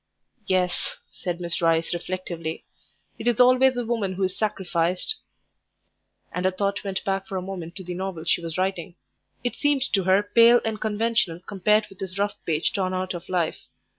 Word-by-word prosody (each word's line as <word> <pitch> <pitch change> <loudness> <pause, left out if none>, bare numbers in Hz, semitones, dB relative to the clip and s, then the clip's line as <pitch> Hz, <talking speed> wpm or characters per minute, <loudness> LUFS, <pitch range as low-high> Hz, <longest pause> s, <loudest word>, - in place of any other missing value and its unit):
"Yes," 185 -1 0 0.2
said 175 -2 -4
Miss 170 -1 -2
Rice 165 0 +2
reflectively, 175 -2 -4 0.5
"it - - -4
is 240 -1 +2
always 255 +1 +6
the 245 -1 -2
woman 220 -5 -1
who 190 +1 -2
is 185 0 0
sacrificed." 185 - -1 1.1
And 180 - -3
her - - +5
thought 200 +1 -1
went 195 -2 -3
back 195 0 -1
for 190 - -3
a - - -2
moment 180 -3 -6
to 190 - -6
the 180 0 -5
novel 185 -2 -4
she 170 - +2
was 165 0 -5
writing. 185 -2 -1 0.5
It 245 - -1
seemed 290 -3 +2
to 195 -3 +2
her 190 +2 +4
pale 230 +3 +6
and 220 -1 -2
conventional 220 -5 +1
compared 210 +3 +2
with 195 - -16
this 190 0 -5
rough 205 +1 +1
page 160 0 +1
torn 185 -2 0
out 185 0 -2
of 175 0 -8
life. 175 -3 0
190 Hz, 185 wpm, -25 LUFS, 175-210 Hz, 1.1 s, always